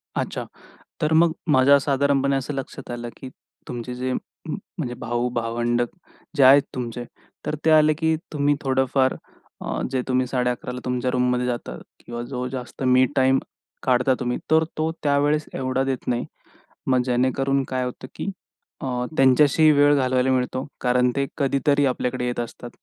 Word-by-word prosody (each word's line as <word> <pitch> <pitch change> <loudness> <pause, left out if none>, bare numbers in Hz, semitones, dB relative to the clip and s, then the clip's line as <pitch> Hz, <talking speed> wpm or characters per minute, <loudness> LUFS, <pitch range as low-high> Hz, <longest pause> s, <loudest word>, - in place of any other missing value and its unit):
अच्छा. - - -3 0.6
तर 155 +1 +2
मग 165 +1 +5 0.2
माझ्या 135 +1 +6
साधारणपणे 140 0 +1
असं 135 +2 -2
लक्षात 135 -2 -6
आलं 120 0 -5
की 130 - -8 0.4
तुमचे 120 0 -5
जे 130 +1 -2
म्ह 155 - -6 0.2
म्हणजे 130 -8 -3
भाऊ-भावंड 120 0 -1 0.6
जे 140 - +6
आहेत 135 +2 +8
तुमचे. 120 -1 -4 0.4
तर - - -1
ते - - +5
आले 155 0 +6
की 160 +1 +1 0.2
तुम्ही 145 0 +2
थोडंफार 130 -1 +1 0.5
अ, - - -3
जे 130 -1 0
तुम्ही 130 0 +1
11:30ला 125 0 -2
तुमच्या 125 0 -1
रूममध्ये 125 0 +1
जाता 120 -1 -3 0.2
किंवा 120 0 -7
जो 125 -1 -4
जास्त 130 0 -6
मी 130 0 +5
टाईम 130 0 +4 0.4
काढता 125 +1 +3
तुम्ही. 125 -1 -1
तर 160 0 +5
तो 160 +1 0
त्यावेळेस 145 +1 +2
एवढा 130 0 -1
देत 135 -2 -3
नाही. 120 -1 0 0.6
मग 130 -1 +3
जेणेकरून 130 +2 +1
काय 130 -1 -1
होतं 125 +1 -7
की - - -3 0.5
अ, - - -4 0.3
त्यांच्याशी 145 +4 +5
वेळ 145 0 +5
घालवायला 130 -1 +2
मिळतो. 130 0 -1 0.2
कारण 125 0 +3
ते 140 0 +1
कधीतरी 140 0 +2
आपल्याकडे 125 -1 -1
येत 120 -1 -2
असतात 120 +1 -6
130 Hz, 155 wpm, -23 LUFS, 125-140 Hz, 0.6 s, आहेत